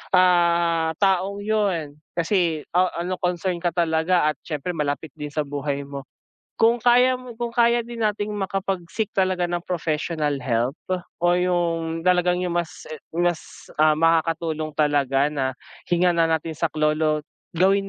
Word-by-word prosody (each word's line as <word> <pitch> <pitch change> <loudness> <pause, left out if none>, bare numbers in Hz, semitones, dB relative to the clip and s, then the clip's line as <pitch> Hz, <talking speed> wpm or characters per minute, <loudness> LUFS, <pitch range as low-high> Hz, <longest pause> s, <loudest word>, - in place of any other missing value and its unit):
ah, 170 -2 +3
taong 195 0 +1
'yun 195 -9 0 0.2
kasi 170 -3 +1
a 180 0 +3
ano 185 +1 -1
concern 180 +1 0
ka 175 - +1
talaga 165 0 +2
at - - -11
siyempre 155 +2 -3
malapit 150 0 -2
din 150 -1 -6
sa 150 0 -1
buhay 140 0 -3
mo. 140 -1 -7 0.6
Kung 230 +1 +4
kaya 250 +2 +5
mo 250 -2 -10
kung 240 -1 -3
kaya 235 0 +4
din 235 -1 -8
nating 210 0 -1
makapag 195 -1 -2
seek 220 -3 -2
talaga 185 -2 +1
ng 175 0 -1
professional 155 -3 -1
help 120 0 0 0.5
o 175 0 +3
yung 170 -2 0
talagang 180 0 +3
yung 175 -1 -2
mas, 170 -1 -4
eh 155 - -6 0.2
mas, 175 -1 -2
ah, 155 0 +6
makakatulong 160 -1 +1
talaga 145 -2 +2
na 135 -3 -1 0.4
hingan 175 0 +3
na 165 - +4
natin 160 0 -1
saklolo 155 -1 +1 0.3
gawin 195 +3 +3
170 Hz, 150 wpm, -23 LUFS, 155-185 Hz, 0.6 s, ah